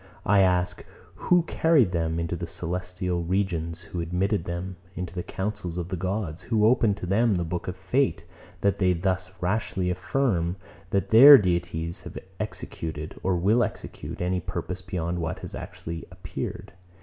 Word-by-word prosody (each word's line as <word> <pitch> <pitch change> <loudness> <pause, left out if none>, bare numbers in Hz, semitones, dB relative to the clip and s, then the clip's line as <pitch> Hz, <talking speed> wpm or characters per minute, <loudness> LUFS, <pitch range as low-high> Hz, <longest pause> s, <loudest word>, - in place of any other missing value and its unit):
I 100 0 +5
ask; 90 -2 +2 0.3
who 180 -1 +3
carried 160 - +3
them 80 -1 0
into 85 +1 -2
the 85 0 -5
celestial 90 0 -3
regions, 85 -2 -1
who 85 0 -5
admitted 90 +3 0
them 90 +1 -4 0.2
into 90 -1 -5
the 90 - -3
councils 95 -2 -4
of 90 0 -3
the 95 - -2
gods, 90 -2 -3
who 105 +4 +2
opened 110 -3 +4
to 90 - -5
them 105 +4 +3
the 90 - 0
book 85 +2 -4
of 90 0 -4
fate, 95 - 0 0.4
that 100 0 +2
they 90 -2 +4
thus 90 +1 -1
rashly 90 -1 0
affirm, 90 -2 0 0.3
that 100 0 0
their 135 +6 +11
deities 85 -4 -1
have - - -9 0.2
executed, 80 -1 -5
or 95 -1 +1
will 100 +8 +3
execute, - - -6
any 90 +1 0
purpose 90 +2 -5
beyond 90 -2 -3
what 80 -1 -2
has - - -8
actually 80 0 -6
appeared? 90 -1 -6
90 Hz, 160 wpm, -26 LUFS, 85-100 Hz, 0.4 s, their